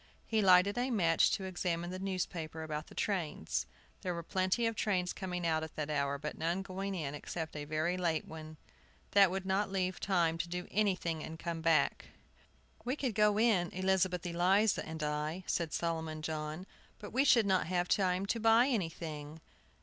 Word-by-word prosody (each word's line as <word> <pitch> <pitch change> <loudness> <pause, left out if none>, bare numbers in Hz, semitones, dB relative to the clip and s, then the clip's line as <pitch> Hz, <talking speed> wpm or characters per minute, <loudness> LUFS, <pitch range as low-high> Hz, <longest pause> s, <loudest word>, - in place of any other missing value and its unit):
He 220 -1 +1
lighted 195 +3 +5
a 250 +2 0
match 170 -9 +3
to 195 - -1
examine 175 -2 -2
the 185 - -5
newspaper 170 -4 -3
about 155 -1 -4
the - - -14
trains. 175 - -2 0.3
There 180 -2 -2
were 170 - -5
plenty 185 +7 +1
of 225 0 0
trains 185 -5 0
coming 180 -2 -4
out 160 -1 +2
at 160 0 -7
that 155 0 -3
hour, 140 -1 0
but 150 +2 -6
none 170 +4 0
going 195 +1 -4
in 150 -5 -3
except 160 +2 -5
a 145 -1 -4
very 155 +4 0
late 170 -3 0
one. 155 -1 -9 0.5
That 200 -2 +6
would 190 +1 -3
not 195 +1 +1
leave 185 -1 -1
time 170 -4 +1
to 170 - -2
do 180 0 -4
anything 180 -6 0
and 160 - -7
come 165 -1 -4
back. 160 -3 +2 0.8
"We 250 +3 -1
could 260 -6 -2
go 210 0 +3
in, 210 -6 +3
Elizabeth 185 -1 +1
Eliza 185 +5 +2
and 160 -1 -5
I," 150 +4 -2
said 165 -3 -1
Solomon 160 -2 -2
John, 155 +2 -4 0.3
"but 205 - -10
we 265 +3 +4
should 240 -6 +5
not 190 -5 +2
have 175 0 0
time 185 -1 +1
to 225 +3 -1
buy 225 +3 +5
anything." 160 - -3
180 Hz, 185 wpm, -33 LUFS, 160-195 Hz, 0.8 s, That